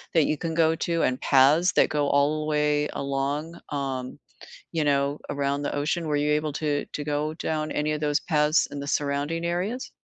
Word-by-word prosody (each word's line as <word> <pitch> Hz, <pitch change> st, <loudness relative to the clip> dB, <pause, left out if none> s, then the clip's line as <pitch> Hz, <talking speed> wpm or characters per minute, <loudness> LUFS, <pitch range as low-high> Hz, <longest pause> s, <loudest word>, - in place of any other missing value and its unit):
that 160 Hz, -, +5 dB
you -, -, +1 dB
can 165 Hz, +1 st, -3 dB
go 160 Hz, -1 st, +4 dB
to 165 Hz, 0 st, -1 dB
and 130 Hz, -, 0 dB
paths 150 Hz, +6 st, +5 dB
that -, -, +4 dB
go 145 Hz, -1 st, 0 dB
all 145 Hz, +2 st, +2 dB
the -, -, -3 dB
way 150 Hz, 0 st, +1 dB
along, 140 Hz, +4 st, -3 dB
um, 135 Hz, -3 st, -4 dB, 0.6 s
you 160 Hz, -2 st, 0 dB
know, 140 Hz, 0 st, +1 dB
around 140 Hz, 0 st, -1 dB
the -, -, -2 dB
ocean, 150 Hz, +3 st, -1 dB
were 150 Hz, -, 0 dB
you 150 Hz, +1 st, +1 dB
able 150 Hz, 0 st, 0 dB
to 145 Hz, -2 st, -1 dB
to 145 Hz, -, -4 dB
go 150 Hz, +1 st, -1 dB
down 155 Hz, -1 st, -2 dB
any 150 Hz, +1 st, 0 dB
of 150 Hz, -, -3 dB
those 145 Hz, -1 st, +1 dB
paths 150 Hz, -1 st, +2 dB
in 145 Hz, -, -6 dB
the 140 Hz, -, -6 dB
surrounding 145 Hz, +4 st, -1 dB
areas? 190 Hz, +9 st, -2 dB
150 Hz, 205 wpm, -26 LUFS, 140-155 Hz, 0.6 s, that